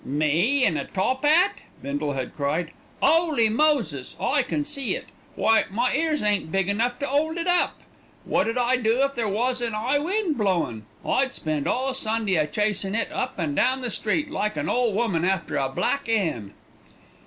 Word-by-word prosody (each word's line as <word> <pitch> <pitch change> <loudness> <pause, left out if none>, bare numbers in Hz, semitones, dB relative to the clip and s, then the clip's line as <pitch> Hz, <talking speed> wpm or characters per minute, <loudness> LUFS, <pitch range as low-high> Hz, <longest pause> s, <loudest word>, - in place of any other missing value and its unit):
"Me 160 - +2
in 160 - +1
a - - -3
top 255 +8 -1
'at!" 330 +6 +3 0.2
Bindle 145 +1 -2
had 130 -2 -5
cried. 155 +3 -1 0.3
"'Oly 315 -9 +3
Moses! 225 - +1
I 285 0 +2
can 290 +3 -2
see 280 -4 -1
it! - - -7 0.3
Why, 225 0 +3
my 235 +6 0
ears 310 -1 0
ain't 205 -6 0
big 195 +1 0
enough 235 +4 0
to 285 - -3
'old 310 +4 0
it 335 - -2
up. 355 -1 +2 0.5
Wot - - +1
'ud 230 - -2
I 250 +1 +2
do 235 +2 +2
if 275 0 0
there 235 -4 -1
was 245 +5 0
an 230 -2 -1
'igh 250 +7 +1
wind 360 - -1
blowin'? 165 - -1 0.2
I'd 265 -1 +1
spend 155 -3 -2
all 265 +1 0
Sunday 220 -5 -1
a 155 -3 +2
chasin' 205 +3 -1
it 230 - -1
up 255 - -3
and 155 -5 -2
down 260 - +2
the 245 -2 -2
street, 295 +10 -1
like 210 - -2
an 150 +1 -2
ole 245 -2 +2
woman 200 -6 0
after 180 -5 0
a 135 -1 0
black 230 - -1
'en." 160 - -1
225 Hz, 190 wpm, -24 LUFS, 170-275 Hz, 0.5 s, at